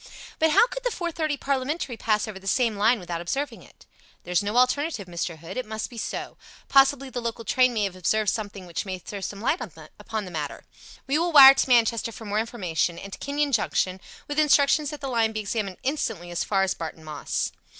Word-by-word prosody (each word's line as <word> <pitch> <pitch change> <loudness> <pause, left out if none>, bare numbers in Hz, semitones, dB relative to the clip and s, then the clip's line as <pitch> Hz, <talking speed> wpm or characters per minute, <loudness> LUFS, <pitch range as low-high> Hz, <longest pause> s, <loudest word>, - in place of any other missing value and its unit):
"But 320 - +4
how 310 - +6
could - - -7
the - - +1
four 350 -6 -3
fifty 310 -3 -1
parliamentary 275 0 -2
pass 215 -1 0
over 205 -3 -7
the 195 - -12
same 230 +1 +2
line 220 +4 +3
without 175 -2 -5
observing 275 +12 -3
it?" - - -19 0.4
"There's 180 +2 +1
no 205 +3 -2
alternative, 255 - +2
Mr. 170 -1 -4
Hood. 165 +7 -9
It 255 - -2
must 220 +2 -5
be 235 - -11
so. - - -5 0.3
Possibly 275 -1 +4
the 245 - -4
local 230 -1 -4
train 255 +3 +3
may 220 -3 0
have 195 -2 -2
observed 210 +3 +1
something 205 -4 -5
which 170 -1 -4
may 190 -2 -4
throw 195 +3 -8
some 200 +1 -5
light 280 +9 0 0.4
upon 220 -2 -4
the 180 - -9
matter. 150 -4 -5 0.4
We 280 +3 +1
will 345 +1 0
wire 275 -3 +11
to 270 - 0
Manchester 230 -1 +3
for 225 - -10
more 210 +1 0
information, 180 -7 -1
and 195 +2 -9
to - - -8
Kenyon 285 +1 -1
Junction 190 -5 0 0.3
with 290 +1 -1
instructions 295 0 +4
that 300 0 -8
the 275 - -3
line 230 -3 +1
be 215 - -2
examined 200 -2 -3
instantly 225 - -2
as 175 - -1
far 195 -2 +1
as 190 - +1
Barton 160 -1 -7
Moss." 155 -2 -3
225 Hz, 220 wpm, -25 LUFS, 195-275 Hz, 0.4 s, wire